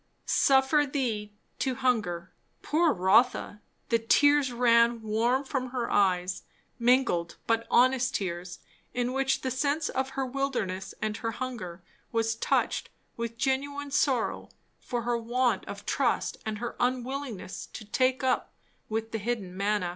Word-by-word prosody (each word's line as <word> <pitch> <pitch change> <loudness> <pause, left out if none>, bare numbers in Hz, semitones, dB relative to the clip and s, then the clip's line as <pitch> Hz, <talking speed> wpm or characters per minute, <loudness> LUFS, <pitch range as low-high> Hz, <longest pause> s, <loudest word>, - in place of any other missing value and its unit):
"Suffered 275 +1 +3
thee 220 -7 -1 0.3
to 260 -2 0
hunger." 210 -9 0 0.3
Poor 325 +1 +3
Rotha! 210 +1 +2 0.3
the 230 - +3
tears 285 +4 +4
ran 235 -1 +4
warm 230 +5 +1
from 265 -2 -3
her 245 -1 -3
eyes, 185 -2 +2 0.4
mingled 235 -9 +2
but 230 0 +1
honest 255 +1 +3
tears, 175 -2 -4 0.3
in 245 0 0
which 270 0 +1
the 260 - -2
sense 285 +4 0
of 265 +1 -3
her 270 - +1
wilderness 250 -8 -2
and 215 -1 -1
her 225 -1 -3
hunger 215 -9 -6 0.3
was 225 0 +1
touched 225 - 0 0.3
with 230 0 -4
genuine 280 +3 -1
sorrow 265 -4 +1 0.3
for 240 -1 -3
her 240 0 0
want 245 +2 +1
of - - -7
trust - - 0
and 215 -1 -2
her 240 +3 -5
unwillingness 250 -5 -3
to 215 - -9
take 255 +5 +1
up 260 -1 +1 0.4
with 225 +1 -2
the 225 - -2
hidden 205 -4 -3
manna. 200 -2 0
240 Hz, 140 wpm, -28 LUFS, 215-265 Hz, 0.4 s, tears